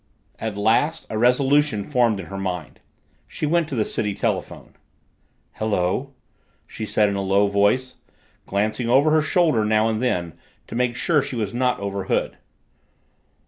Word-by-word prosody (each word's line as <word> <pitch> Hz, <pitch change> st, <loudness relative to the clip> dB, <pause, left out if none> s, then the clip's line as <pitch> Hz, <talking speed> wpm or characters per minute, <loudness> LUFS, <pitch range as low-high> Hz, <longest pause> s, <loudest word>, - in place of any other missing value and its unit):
At 110 Hz, -2 st, -4 dB
last 115 Hz, +10 st, +1 dB
a 110 Hz, -, -2 dB
resolution 130 Hz, -1 st, +3 dB
formed 120 Hz, -6 st, +1 dB
in 95 Hz, -, -6 dB
her 95 Hz, -, -7 dB
mind. 90 Hz, -2 st, -5 dB, 0.5 s
She -, -, -4 dB
went 165 Hz, +1 st, +1 dB
to 135 Hz, -, -4 dB
the 110 Hz, -3 st, +1 dB
city 105 Hz, -2 st, -2 dB
telephone. -, -, -3 dB, 0.8 s
"Hello," 110 Hz, +5 st, -1 dB, 0.5 s
she 110 Hz, -, -7 dB
said 105 Hz, 0 st, +2 dB
in 100 Hz, -, -1 dB
a 100 Hz, -, -1 dB
low 100 Hz, +1 st, +2 dB
voice, 100 Hz, +6 st, +1 dB, 0.5 s
glancing 110 Hz, +4 st, -1 dB
over 140 Hz, +5 st, +4 dB
her 155 Hz, 0 st, +4 dB
shoulder 155 Hz, -7 st, +2 dB
now 110 Hz, +1 st, +2 dB
and 110 Hz, 0 st, -2 dB
then 90 Hz, -10 st, -1 dB, 0.3 s
to -, -, -11 dB
make 120 Hz, 0 st, 0 dB
sure 150 Hz, +3 st, +2 dB
she 130 Hz, -, -5 dB
was 105 Hz, -3 st, -3 dB
not 125 Hz, +1 st, 0 dB
overheard. 100 Hz, -1 st, -2 dB
110 Hz, 155 wpm, -22 LUFS, 100-130 Hz, 0.8 s, over